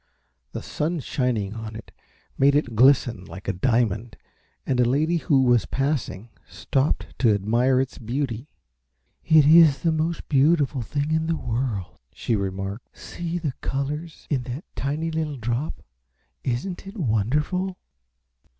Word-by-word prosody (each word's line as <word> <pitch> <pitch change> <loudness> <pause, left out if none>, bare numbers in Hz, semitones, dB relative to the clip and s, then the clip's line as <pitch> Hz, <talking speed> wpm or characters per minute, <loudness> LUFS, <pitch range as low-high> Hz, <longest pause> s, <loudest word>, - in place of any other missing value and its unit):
The - - -5
sun 165 +3 -2
shining 120 -7 -1
on 110 -1 -7
it 110 - -10 0.4
made 140 +1 +4
it 125 -6 0
glisten 125 -4 +4
like 95 - -10
a - - +1
diamond 115 +1 0 0.5
and 130 -2 0
a - - +6
lady 155 +6 +2
who 140 -4 +3
was 120 -4 +3
passing 135 -6 -2 0.2
stopped 130 - -1
to 115 -4 +4
admire 120 +6 +2
its 130 0 -2
beauty. 120 +2 -3 0.7
"It 155 -2 +5
is 155 -3 +6
the 165 - +3
most 160 +1 -2
beautiful 145 -1 +3
thing 145 +6 -2
in 160 0 +1
the 165 - +1
world," 115 -6 -3
she 115 - -1
remarked. 95 +2 -4
"See 170 0 -5
the 155 -6 -2
colors 150 +4 -4
in 135 -4 +1
that 130 +6 -6
tiny 150 +4 -2
little 155 -3 -2
drop. 120 +6 -3 0.6
Isn't 155 +10 -3
it 200 +3 -9
wonderful?" 150 - 0
135 Hz, 140 wpm, -24 LUFS, 115-155 Hz, 0.7 s, a